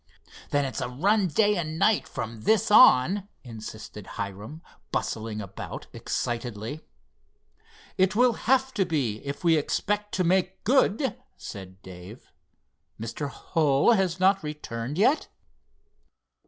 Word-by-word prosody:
"Then 145 -1 +1
it's 130 - -4
a - - -2
run 195 - +2
day 205 +6 +2
and 160 -2 -3
night 215 +4 +2
from 110 -1 -6
this 215 - +2
on," 200 - +6 0.2
insisted 110 -3 -9
Hiram, 105 - -6 0.3
bustling 110 -1 -3
about 100 - -8
excitedly. 120 +3 -4 1.2
"It 190 +2 +3
will 245 +1 +4
have 265 +4 +1
to 195 -4 +1
be, 135 -11 -1
if 140 +5 -6
we 165 -2 +4
expect 210 +7 -1
to 185 - +1
make 185 +1 +1
good," 255 0 +2 0.2
said 95 -2 -10
Dave. 95 +5 -12 0.7
"Mr. 115 +6 -4
Hull 145 - +2
has 190 -5 +1
not 195 +1 +4
returned 150 -3 -5
yet?" 260 +10 +3
155 Hz, 125 wpm, -26 LUFS, -, 1.2 s, on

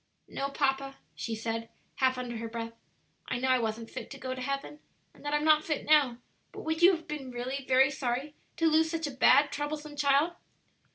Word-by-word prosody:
"No, 275 - -3
papa," 275 -1 0 0.2
she 225 - -4
said, 225 +1 -3 0.3
half 260 -2 +2
under 245 -2 -4
her 230 +1 -4
breath; 230 0 -5 0.5
"I 255 - -1
know 260 +2 0
I 255 -1 +4
wasn't 225 0 -3
fit - - -7
to 275 - -8
go 260 -1 -4
to 255 - -6
heaven, 275 +3 -4 0.3
and - - -18
that 290 - -3
I'm 295 - +1
not 310 0 +5
fit 305 -3 -2
now; 290 -6 +4 0.3
but - - -8
would 320 +1 -2
you 365 +2 +8
have 325 - -10
been 290 -4 -5
really 255 +3 -4
very 265 +2 +5
sorry 265 +2 -2 0.2
to 330 - +1
lose 320 0 +4
such 325 -1 -2
a 290 - -3
bad, 270 +2 +5
troublesome 295 0 -4
child?" 290 +3 +3
275 Hz, 210 wpm, -30 LUFS, 250-300 Hz, 0.5 s, you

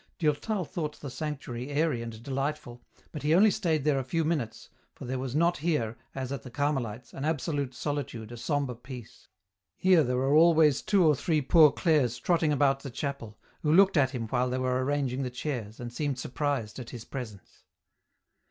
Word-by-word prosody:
Durtal 175 +5 0
thought 150 -2 -5
the 140 - -7
sanctuary 135 -3 -5
airy 145 -4 0
and 115 -1 -8
delightful, 135 -2 -3 0.3
but 150 - -6
he 150 +2 +3
only 205 +4 +6
stayed 165 -9 0
there 145 -2 +2
a - - -2
few 165 +6 -1
minutes, 130 -9 -2 0.3
for - - -9
there 130 +1 -3
was 130 0 -4
not 170 +3 +3
here, 145 -8 -1 0.2
as 130 -1 -4
at 140 -4 -4
the 125 - -10
Carmelites, 125 -4 -2
an 135 - -6
absolute 145 -4 -1
solitude, 125 -6 -4
a - - -6
sombre 140 +1 -1
peace; 120 -1 -11 0.5
here 185 -4 +4
there 125 -1 0
were 135 +2 +1
always 160 -3 +5
two 195 -4 +3
or 155 - +6
three 155 +3 +1
Poor 155 +1 +7
Clares 145 -9 +2
trotting 165 -3 +1
about 140 -1 +3
the 135 - -7
chapel, 130 -5 -5 0.2
who 150 - +1
looked 195 +3 +6
at 140 -5 +4
him 125 -4 -4
while 125 +1 +1
they 130 - -1
were 130 0 0
arranging 135 -2 -1
the 130 - -2
chairs, 120 -4 -5
and 120 -1 -6
seemed 145 0 -2
surprised 130 -3 -2
at 120 - -7
his 120 -3 -8
presence. 115 -7 -8
140 Hz, 190 wpm, -28 LUFS, 125-155 Hz, 0.5 s, Poor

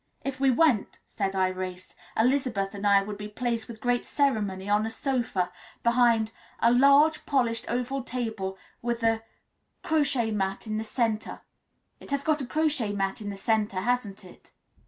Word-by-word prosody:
"If 275 -1 -4
we 270 0 +4
went," 255 -4 +2
said 195 -2 -2
Irais, 185 -1 -2 0.2
"Elizabeth 230 -5 +1
and 205 0 -2
I 200 -1 +5
would 205 0 -6
be 210 - -5
placed 230 +1 -2
with 230 -2 -9
great 245 +1 +1
ceremony 205 -9 0
on 205 +1 +3
a 225 - -2
sofa 230 - -1 0.3
behind 235 -2 +3 0.3
a 235 - +4
large, 280 +5 +5
polished 240 -5 +1
oval 250 +3 -1
table 220 -7 -4 0.2
with 235 0 -2
a 225 0 +2 0.6
crochetmat 235 -11 0
in 215 -1 -2
the - - -2
centre 225 -1 -2 0.6
it - - -13
has 280 0 -1
got 310 -2 +1
a 260 - -4
crochet 300 -8 +1
mat 195 +2 -2
in 205 - -4
the 200 - -6
centre, 210 -2 0
hasn't 215 -4 -1
it?" 180 - -16
225 Hz, 160 wpm, -27 LUFS, 200-255 Hz, 0.6 s, I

